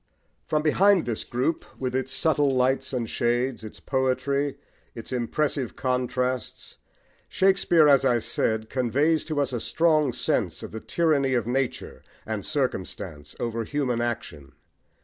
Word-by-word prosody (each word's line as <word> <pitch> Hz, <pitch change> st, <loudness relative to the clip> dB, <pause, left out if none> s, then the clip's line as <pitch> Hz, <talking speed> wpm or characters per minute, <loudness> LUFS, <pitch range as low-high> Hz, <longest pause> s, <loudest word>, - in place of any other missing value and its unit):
From 150 Hz, 0 st, 0 dB
behind 190 Hz, +4 st, +4 dB
this 115 Hz, -3 st, -2 dB
group 130 Hz, +7 st, -1 dB, 0.2 s
with 130 Hz, -1 st, -2 dB
its 130 Hz, 0 st, -1 dB
subtle 145 Hz, 0 st, +2 dB
lights 130 Hz, 0 st, +1 dB
and 120 Hz, -4 st, -2 dB
shades, 120 Hz, +1 st, -1 dB
its 110 Hz, -, -9 dB
poetry, 140 Hz, +1 st, 0 dB, 0.4 s
its 115 Hz, -, -8 dB
impressive 130 Hz, +1 st, -1 dB
contrasts, 125 Hz, -1 st, -2 dB, 0.5 s
Shakespeare, 190 Hz, -5 st, +4 dB
as 140 Hz, -2 st, +5 dB
I 125 Hz, -3 st, +3 dB
said, 110 Hz, -1 st, -1 dB
conveys 140 Hz, +6 st, +1 dB
to 155 Hz, -2 st, -2 dB
us 140 Hz, -2 st, 0 dB
a 120 Hz, -, -1 dB
strong 155 Hz, +1 st, +2 dB
sense -, -, -1 dB
of -, -, -7 dB
the 110 Hz, -, -6 dB
tyranny 145 Hz, -6 st, +1 dB
of 120 Hz, -3 st, 0 dB
nature 130 Hz, +1 st, -2 dB, 0.2 s
and 110 Hz, -2 st, -3 dB
circumstance 95 Hz, -, -3 dB
over 115 Hz, -1 st, -2 dB
human 125 Hz, -1 st, -1 dB
action. 80 Hz, -12 st, -4 dB
130 Hz, 140 wpm, -25 LUFS, 120-145 Hz, 0.5 s, as